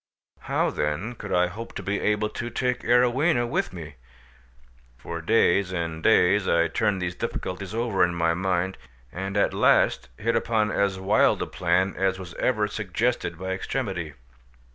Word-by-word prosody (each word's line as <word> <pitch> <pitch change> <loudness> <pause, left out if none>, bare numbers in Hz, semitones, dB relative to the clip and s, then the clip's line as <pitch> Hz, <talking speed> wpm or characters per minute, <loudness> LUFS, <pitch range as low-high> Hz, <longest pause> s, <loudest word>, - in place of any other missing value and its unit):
How - - 0
then 75 +11 -2
could - - -8
I 90 0 +3
hope 105 +7 -8
to 95 - -5
be 100 +2 -1
able 105 0 0
to 120 - -5
take 125 +1 -1
Arowhena 125 +2 +3
with - - -1
me? 80 -5 -9 1.0
For 85 +7 -6
days 95 0 +3
and 85 -3 -3
days 100 -1 +4
I 85 -1 +3
turned 95 +3 0
these 90 0 -2
difficulties 95 +3 -5
over 115 -5 +1
in 85 -1 +1
my 85 -1 +2
mind, 95 +1 -1 0.3
and 95 +2 -4
at 100 - +2
last - - +3
hit 115 +2 0
upon 110 -2 +1
as 100 -2 0
wild 100 +3 +3
a - - -3
plan 90 +2 0
as 95 -1 0
was 90 -2 -9
ever 110 -5 +1
suggested 105 -2 -2
by 95 +2 -4
extremity. 95 - -3
95 Hz, 165 wpm, -25 LUFS, 90-110 Hz, 1.0 s, days